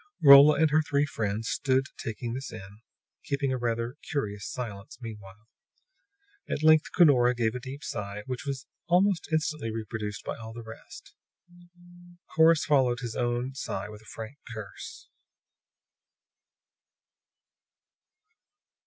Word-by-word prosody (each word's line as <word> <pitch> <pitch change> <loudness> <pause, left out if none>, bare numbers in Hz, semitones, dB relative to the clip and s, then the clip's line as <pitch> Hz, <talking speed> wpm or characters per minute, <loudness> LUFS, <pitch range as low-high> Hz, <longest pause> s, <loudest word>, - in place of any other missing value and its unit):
Rolla 140 +1 +9
and 160 -2 +4
her 155 +1 +4
three 145 -1 +1
friends 110 -4 -3
stood 135 0 +1
taking 115 +1 -5
this 135 +2 -5
in, 105 -1 -11 0.4
keeping 140 -2 -1
a - - -1
rather 120 +2 -2
curious 105 -8 -3
silence 105 -6 -7
meanwhile. 105 -2 -10 1.0
At 155 - -2
length 155 0 +5
Cunora 125 -8 +5
gave 115 -2 0
a 125 - -4
deep 135 +3 -8
sigh, 100 0 -5
which 125 -2 -5
was 140 -1 -4 0.2
almost 180 0 +2
instantly 155 -5 -1
reproduced 110 -1 -5
by - - -4
all 110 -1 -9
the 115 0 -8
rest. 110 0 -12 1.2
Corrus 160 0 +5
followed 130 -3 +2
his 120 -2 -5
own 120 +1 -1
sigh 100 -6 -4
with 105 0 -11
a - - -20
frank 115 +6 -9
curse. 105 -4 -9
120 Hz, 125 wpm, -28 LUFS, 110-145 Hz, 1.2 s, Rolla